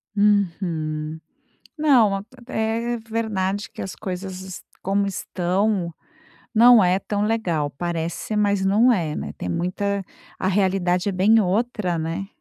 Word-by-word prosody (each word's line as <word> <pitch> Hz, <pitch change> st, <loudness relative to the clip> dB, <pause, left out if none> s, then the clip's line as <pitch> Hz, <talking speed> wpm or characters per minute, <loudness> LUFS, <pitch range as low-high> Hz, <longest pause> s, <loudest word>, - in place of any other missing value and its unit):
Uhum, 165 Hz, -6 st, 0 dB, 0.6 s
não 255 Hz, -10 st, +4 dB
a 195 Hz, -, -4 dB, 0.2 s
é 230 Hz, 0 st, -1 dB
é -, -, -2 dB
verdade 205 Hz, -3 st, -1 dB
que -, -, -8 dB
as 190 Hz, -, -5 dB
coisas 190 Hz, -1 st, -6 dB, 0.2 s
como 200 Hz, +1 st, +1 dB
estão, 185 Hz, -1 st, -1 dB, 0.6 s
não 235 Hz, -1 st, +7 dB
é 180 Hz, +2 st, +3 dB
tão 205 Hz, 0 st, -2 dB
legal, 175 Hz, -10 st, 0 dB
parece, 170 Hz, +6 st, -3 dB
mas 200 Hz, -2 st, +2 dB
não 215 Hz, +6 st, +5 dB
é, 165 Hz, -9 st, 0 dB
né, -, -, -5 dB
tem 90 Hz, -, -4 dB
muita 200 Hz, -, -1 dB, 0.3 s
A 185 Hz, -, -1 dB
realidade 185 Hz, -1 st, +1 dB
é -, -, -1 dB
bem 200 Hz, +5 st, +4 dB
outra, 205 Hz, -2 st, 0 dB
né? 165 Hz, +4 st, -3 dB
195 Hz, 135 wpm, -23 LUFS, 175-215 Hz, 0.6 s, não